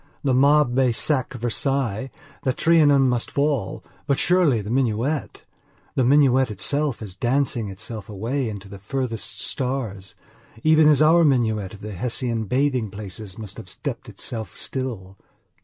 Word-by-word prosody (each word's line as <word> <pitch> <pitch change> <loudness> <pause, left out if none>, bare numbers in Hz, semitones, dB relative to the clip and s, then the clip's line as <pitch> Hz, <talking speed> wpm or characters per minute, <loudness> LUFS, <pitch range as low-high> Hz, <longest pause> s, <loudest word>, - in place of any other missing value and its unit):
The 135 -3 +2
mob 140 +1 +4
may 130 -1 +3
sack 130 +3 0
Versailles; 125 0 -1 0.3
the 130 - 0
Trianon 145 -4 +4
may 125 -1 +2
fall, 140 -7 -1 0.2
but 140 - +2
surely 175 -9 +3
the 105 +1 -5
minuetthe 130 +3 -1 0.5
minuet 130 0 +4
itself 130 +6 -1
is 100 -4 -6
dancing 120 0 0
itself 105 +3 -8
away 115 +5 -2
into 100 -2 -7
the 100 0 -10
furthest 115 +1 -3
stars, 115 -8 -3 0.5
even 155 0 +5
as 150 0 +5
our 165 +2 +6
minuet 110 - +1
of 100 - -15
the 105 - -6
Hessian 115 +1 -2
bathing 130 -1 0
places 100 -1 -8
must 105 -4 -7
be - - -7
stepping - - -6
itself 110 -6 -6
still. 110 -8 -5
125 Hz, 140 wpm, -23 LUFS, 105-140 Hz, 0.5 s, our